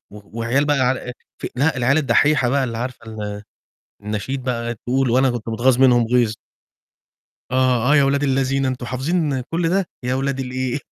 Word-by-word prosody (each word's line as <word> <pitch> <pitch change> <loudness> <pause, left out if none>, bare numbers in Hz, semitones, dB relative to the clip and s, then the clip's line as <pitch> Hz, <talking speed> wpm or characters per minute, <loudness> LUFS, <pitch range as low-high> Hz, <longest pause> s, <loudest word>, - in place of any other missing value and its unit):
و 105 +2 -12
وعيال 125 +5 +1
بقى 145 -1 +2
ع 130 0 +3
إيه، 125 -1 -6 0.3
ف - - -4
لأ، 145 +2 +1
العيال 130 +5 +2
الدحيحة 145 -2 +3
بقى 135 +1 +1
اللي 115 -2 -4
عارفة 125 -1 -6
ال 105 -2 -6 0.6
النشيد 105 +6 -4
بقى 120 -2 -2
تقول، 125 +3 -1
وأنا 130 +2 +3
كنت 120 -2 -5
متغاظ 120 +3 +2
منهم 120 -3 +5
غيظ. 120 -2 +2 1.2
آه، 130 +1 +2
آه، - - +6
يا 140 - +5
ولاد 140 +1 +1
اللذينة، 135 -1 +1
أنتم 130 -1 -4
حافظين 140 +2 -1
كلّ 165 +6 -2
ده، 190 +1 +1 0.2
يا 125 +1 -1
ولاد 135 0 -1
الإيه. 130 +1 -2
130 Hz, 180 wpm, -20 LUFS, 120-135 Hz, 1.2 s, آه